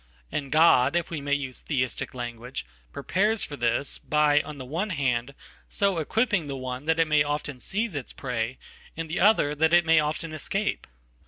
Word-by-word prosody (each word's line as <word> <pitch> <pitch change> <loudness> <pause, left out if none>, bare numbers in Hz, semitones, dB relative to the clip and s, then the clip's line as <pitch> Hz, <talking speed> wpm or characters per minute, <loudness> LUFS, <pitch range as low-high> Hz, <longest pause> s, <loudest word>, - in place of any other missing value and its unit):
And 140 -2 -3
God, 155 -3 +5
if 175 -1 -1
we 155 -3 -3
may 145 0 +1
use 135 -3 -4
Theisticlanguage, 125 -2 -3 0.3
prepares 200 - +1
for 145 - -5
this, 120 +2 0
by, 150 -1 +3
on 150 -1 -9
the 130 - -7
one 170 +11 -2
hand, 135 -5 -1 0.3
so 200 -4 +1
equipping 210 0 0
theone 130 0 -5
that 160 0 +3
it 165 -1 +3
may 150 -1 +4
often 145 -2 -2
seize 210 - -1
its 140 -4 -5
prey, 125 -1 -3 0.4
and 165 0 -3
the 160 - -3
other, 190 -7 +4
that 160 +3 +3
it 175 -1 +4
mayoften 155 0 +1
escape. 195 +7 -2
150 Hz, 170 wpm, -26 LUFS, 130-165 Hz, 0.4 s, God